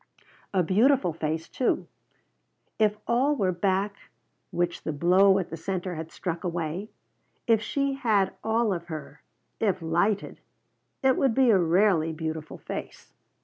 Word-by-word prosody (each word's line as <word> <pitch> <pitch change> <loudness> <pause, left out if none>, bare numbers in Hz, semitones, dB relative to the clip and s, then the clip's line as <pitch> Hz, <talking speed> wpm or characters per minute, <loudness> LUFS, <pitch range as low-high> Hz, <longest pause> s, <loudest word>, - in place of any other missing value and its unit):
A 185 -2 +2
beautiful 210 - +3
face, 160 0 -3
too. 255 - 0 0.9
If 210 -1 +3
all 265 +5 +2
were 195 -8 +1
back 195 +3 0 0.5
which 175 0 -1
the - - -3
blow 185 +6 +4
at 190 - -3
the 165 - -5
center 180 +2 -3
had 160 0 -6
struck 170 -2 -4
away, 175 +3 -3 0.6
if 225 -3 +3
she 275 +3 -1
had 220 -8 +1
all 220 -1 +1
of 170 -1 -5
her 155 -2 -8 0.4
if 195 -4 +1
lighted 175 +5 0 0.6
it 265 -1 +4
would 265 -5 +2
be 260 -3 +5
a 195 - +5
rarely 170 -1 +3
beautiful 160 -1 -5
face. - - -8
190 Hz, 145 wpm, -27 LUFS, 165-220 Hz, 0.9 s, be